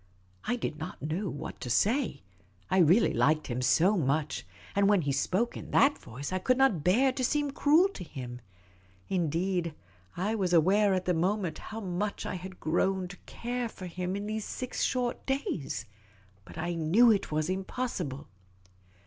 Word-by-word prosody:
I 245 - +1
did 160 -10 -4
not 155 - -6
know 165 +7 -2
what 145 - -7
to 125 - -4
say. 215 - +1 0.5
I 190 - +4
really 180 +7 +5
liked 155 +1 +2
him 125 0 -3
so 175 +10 +4
much; 150 -2 -1 0.3
and 200 0 +4
when 200 -5 +4
he 140 - 0
spoke 185 - 0
in - - -8
that 280 +1 +4
voice, 135 +8 -7
I 185 - 0
could 255 +7 +2
not 265 - +3
bear 245 - +4
to 255 0 -3
seem 290 +2 +1
cruel 305 +6 +4
to 290 - -8
him. 125 -6 -8 0.7
Indeed, 175 -1 0 0.4
I 200 +5 0
was 190 -5 0
aware 195 +4 +4
at 185 -1 -2
the 180 - +2
moment 185 +1 0
how 225 +1 -7
much 200 +2 -3
I - - -3
had 185 0 -7
grown 185 +3 0
to 195 - -10
care 245 0 -3
for 185 - -9
him 180 +1 -3
in 200 +1 -4
those 215 0 -3
six 255 +4 -4
short 245 -2 0
days. 265 - -2 0.6
But - - -12
I 175 +1 -2
knew 175 +9 +5
it 200 -6 0
was 155 0 0
impossible. 185 - -3
185 Hz, 175 wpm, -29 LUFS, 160-225 Hz, 0.7 s, really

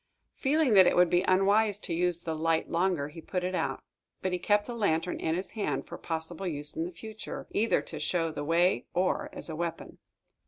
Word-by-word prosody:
Feeling 290 -2 +2
that 190 -2 +8
it - - +3
would 180 -1 +5
be 175 - +4
unwise 200 +2 +3
to 170 - -4
use 175 0 0
the 160 - -2
light 160 +1 0
longer, 170 -4 +1
he 165 +2 -10
put 180 +3 -3
it 185 +1 -2
out. - - -2 0.4
But 185 - 0
he 180 - 0
kept 205 +3 +2
the 245 - -5
lantern 180 -6 0
in 160 - 0
his 185 +2 -4
hand, 150 -11 -2
for - - -9
possible 165 +3 -4
use 150 -2 -1
in 165 - -1
the 175 - -5
future, 220 +4 -8
either 225 +2 +2
to - - -7
show 165 -2 0
the 145 - -5
way 165 -3 +2
or 185 +1 +1
as - - -3
a 160 - -5
weapon. 170 0 -5
175 Hz, 220 wpm, -29 LUFS, 165-195 Hz, 0.4 s, that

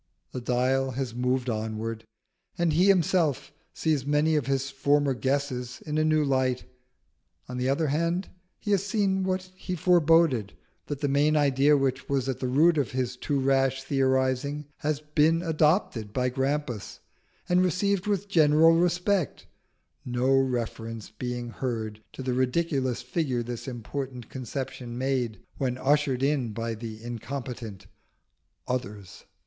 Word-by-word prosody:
The 125 - -5
dial 130 +2 +1
has 130 -2 -3
moved 125 +1 0
onward, 110 0 -3 0.5
and 170 -3 +2
he 180 +5 +4
himself 170 -7 +2 0.2
sees 155 -5 0
many 150 +3 +2
of 145 -5 0
his 135 0 0
former 140 +1 +2
guesses 130 -2 -2
in 150 0 -1
a - - +3
new 155 -1 +3
light. 130 -2 +1 0.8
On 125 - -6
the 125 +1 0
other 140 +4 +1
hand, 170 +5 0 0.3
he 205 - -4
has 195 -2 +3
seen 195 -2 +1
what 185 0 -2
he 185 0 -4
foreboded, 165 - +3 0.3
that 145 -1 -4
the 145 - +1
main 145 +2 +3
idea 145 0 +4
which 130 -1 -1
was 135 -2 0
at 130 - -2
the 130 - -2
root 155 +5 +4
of 135 - 0
his 125 -1 -1
too 140 +3 -1
rash 135 0 +2
theorising 135 +1 0
has 150 0 -1
been 155 +2 +2
adopted 155 - +1
by 125 -1 +1
Grampus 135 -3 -2 0.5
and 180 0 +3
received 195 +2 +1
with 205 -1 0
general 160 -3 +5
respect, 180 +1 +1 0.6
no 125 +2 +1
reference 115 -4 -2
being 120 +1 -4
heard 110 -3 -4
to 130 - -7
the 130 -1 -1
ridiculous 130 -1 0
figure 125 -2 -1
this 120 +1 -6
important 125 0 -5
conception 130 -1 -5
made 125 -5 -1 0.2
when 130 -3 -1
ushered 140 -1 +1
in 135 -6 +1
by 115 +1 -3
the 110 0 -8
incompetent 120 -4 -6 0.8
"Others." 105 -6 -5
135 Hz, 145 wpm, -27 LUFS, 125-155 Hz, 0.8 s, general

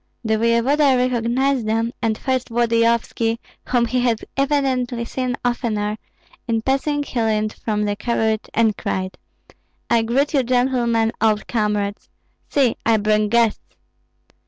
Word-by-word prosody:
The 220 -1 +1
voevoda 255 +5 +3
recognized 250 0 +1
them, 225 +2 0
and 220 -2 0
first 260 -1 -2
Volodyovski, 230 -1 +1 0.3
whom 245 -2 +2
he 250 +2 0
had 240 -3 0
evidently 265 -4 0
seen 250 +1 -2
oftener; 215 -4 -1 0.5
in 225 -1 0
passing 290 +3 0
he 250 -4 -3
leaned 215 -1 0
from 210 -1 -2
the 205 0 -1
carriage 220 0 -1
and 225 -2 +3
cried, 185 -1 -4 0.7
"I 235 -1 +4
greet 260 +7 0
you, 280 - +4
gentlemen, 245 -2 +1
old 215 -2 +2
comrades! 210 -2 -1 0.4
See, 265 -5 +2
I 225 -1 +3
bring 210 0 +1
guests!" 230 -1 +1
235 Hz, 135 wpm, -21 LUFS, 220-255 Hz, 0.7 s, I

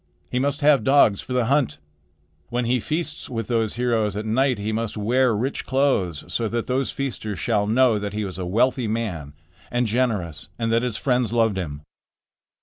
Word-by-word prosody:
He 125 - 0
must 140 +3 -1
have 145 -5 +5
dogs 135 -7 +4
for 130 - -6
the 125 -2 +2
hunt. 130 - +1 0.7
When 120 0 -1
he 125 +2 +2
feasts 155 +4 -3
with 115 -3 -3
those 115 -3 0
heroes 115 -4 0
at 105 - -3
night 125 +3 +2
he 105 +2 -3
must 110 0 -3
wear 120 +3 +2
rich 130 +6 -2
clothes, 130 - +1
so 110 +6 -1
that 115 +1 -2
those 130 +1 0
feasters 110 -7 -4
shall 105 +4 0
know 115 -1 +3
that 100 0 -4
he 105 0 -2
was 95 -2 -6
a - - -2
wealthy 120 +5 +2
man 100 -10 -3 0.4
and 120 0 0
generous, 105 -9 -1
and 115 -1 -1
that 115 +1 +3
his 120 -3 -2
friends 125 -4 +1
loved 115 -3 +2
him." 75 -6 -5
115 Hz, 190 wpm, -23 LUFS, 105-125 Hz, 0.7 s, have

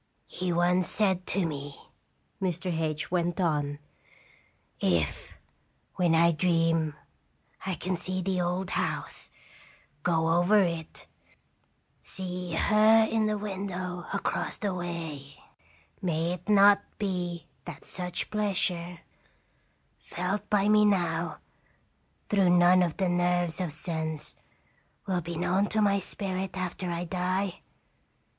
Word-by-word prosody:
"" - - -44
"He 180 -1 -3
once 175 +1 +2
said 190 -4 +1
to 190 -1 +1
me," 145 -3 -5 0.6
Mr. 180 -1 -1
H 155 -1 -2
went 175 0 0
on: 150 -5 0 1.0
"'If, 85 -5 0 0.6
when 175 -3 +2
I 170 +1 +5
dream, 165 -2 +1 0.7
I 190 - 0
can 185 +4 -2
see 185 +1 -3
the 185 -1 0
old 180 +1 -1
house, - - -2 0.7
go 165 0 +1
over 205 +4 +5
it, 170 -3 -4 1.0
see 180 -2 -4
her 215 +5 +5
in 220 -1 +2
the 215 0 0
window 185 -3 -4
across 200 - -2
the 200 -3 -2
way, 165 -6 -5 0.7
may 170 -2 0
it 180 +3 -8
not 200 -1 +7 0.2
be 175 -5 -3 0.2
that 165 -3 -9
such 180 -1 -3
pleasure, 180 -5 -1 1.0
felt 195 +4 -3
by 205 -1 +3
me 210 0 +5
now 175 -5 +1 0.9
through 195 -3 +3
none 175 +1 +6
of 170 -3 0
the 190 - +1
nerves 175 -1 +1
of 175 -4 -2
sense, 160 0 -2 0.7
will 185 -3 0
be 170 0 -5
known 185 +4 +1
to 220 - 0
my 200 -1 +3
spirit 190 -1 -4
after 185 0 -3
I 170 0 -2
die 185 +1 -1
180 Hz, 125 wpm, -28 LUFS, 170-190 Hz, 1.0 s, not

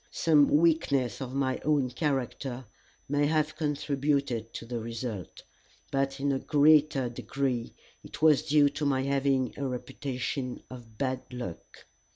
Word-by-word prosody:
Some 150 -3 +4
weakness 145 -7 +2
of 130 0 -5
my 130 -2 0
own 145 -4 +1
character 130 -2 -2 0.4
may 145 +1 +2
have 155 0 +1
contributed 140 -5 -1
to - - -6
the 120 0 -4
result, 115 -4 -6 0.5
but 135 0 -1
in 140 +1 +1
a 135 - 0
greater 150 -3 +4
degree 125 +1 -3 0.3
it - - -10
was 155 -2 +5
due 145 -1 +5
to 145 - -5
my 135 -1 +1
having 135 -2 +1
a 140 - -2
reputation 125 +1 -4
for 130 - -9 0.2
bad 130 0 -1
luck. 120 -9 -8
135 Hz, 140 wpm, -29 LUFS, 125-145 Hz, 0.5 s, was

